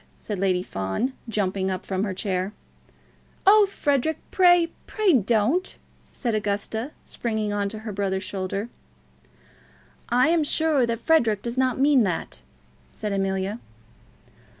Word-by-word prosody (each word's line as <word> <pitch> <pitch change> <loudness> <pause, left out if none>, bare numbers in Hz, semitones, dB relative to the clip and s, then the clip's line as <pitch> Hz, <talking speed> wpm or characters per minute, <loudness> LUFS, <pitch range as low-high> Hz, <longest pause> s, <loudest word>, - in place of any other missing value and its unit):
said 210 -3 -5
Lady 185 -2 +1
Fawn, 95 - -2 0.2
jumping 195 -3 0
up 185 -1 -4
from 190 0 -1
her 205 - -1
chair. 190 +1 -2 0.9
"Oh, 410 +1 +7
Frederic, 295 -4 0
pray, 350 -2 +5 0.2
pray 425 -5 +2
don't!" 240 - +2 0.4
said 235 -4 -2
Augusta, 215 +3 -2
springing 220 -3 -3
on 200 -1 -1
to 215 - -7
her 215 - -3
brother's 190 -1 -1
shoulder. 195 +3 -4 1.4
"I 250 +5 +4
am 335 -1 +3
sure 295 -4 +2
Frederic 230 -7 +2
does 235 0 -4
not 260 -2 +1
mean 280 -1 +5
that," 185 -6 -2 0.5
said 210 -2 -3
Amelia. 195 +2 -1
215 Hz, 125 wpm, -24 LUFS, 195-275 Hz, 1.4 s, Oh